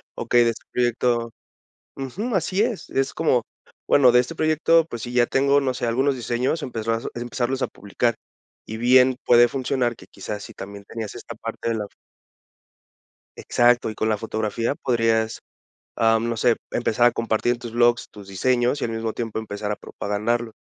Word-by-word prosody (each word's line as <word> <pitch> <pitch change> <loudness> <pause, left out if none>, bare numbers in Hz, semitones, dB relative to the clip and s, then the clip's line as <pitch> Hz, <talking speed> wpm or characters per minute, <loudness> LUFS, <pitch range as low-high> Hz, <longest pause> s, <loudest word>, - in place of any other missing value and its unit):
"Okey 120 0 +3
de 115 - +3
este 115 - -12
proyecto" 120 -1 0 0.6
ujú, 195 - -4
así 185 +3 0
es, 230 -3 -2
es 135 0 -1
como, 130 -8 +2 0.4
bueno, 130 -4 +6
de 125 - +6
"este 125 +7 -2
proyecto, 160 +1 +3
pues 120 -7 -7
si, 120 - -6
ya 125 -1 +4
tengo 140 +3 +3
no 130 -2 0
sé, 125 - -3
algunos 130 +4 +1
diseños", 125 +6 -1
empezar 115 -2 -2
a 120 - -6
empezarlos 120 +2 -2
a - - +1
publicar, 110 +3 -2 0.5
y 110 - -6
bien 125 +2 +5
puede 120 0 +6
funcionar, 125 -1 -1
que - - -15
quizás 100 +1 -7
si - - -10
también 100 +1 -9
tenías 110 -2 -6
esta - - -9
parte - - -5
de 115 - 0
la 105 -2 -3 1.5
exacto 120 -1 +2
y 110 - -7
con 110 - -1
la 110 - +1
fotografía 110 +3 -2
podrías, 115 -3 0 0.6
am, 115 +1 +2
no 115 - -2
sé, 120 +1 +3 0.2
empezar 120 0 +2
a 120 - +3
compartir 115 +1 0
en 120 - -9
tus 120 -1 -7
blogs, 120 -1 +2
tus 100 -2 -13
diseños 125 +6 +1
y - - +1
al 115 - -3
mismo 115 0 -2
tiempo 115 -2 -3
empezar 105 -1 -4
a - - -1
propagarlo. 110 +4 -3
120 Hz, 185 wpm, -23 LUFS, 115-130 Hz, 1.5 s, bueno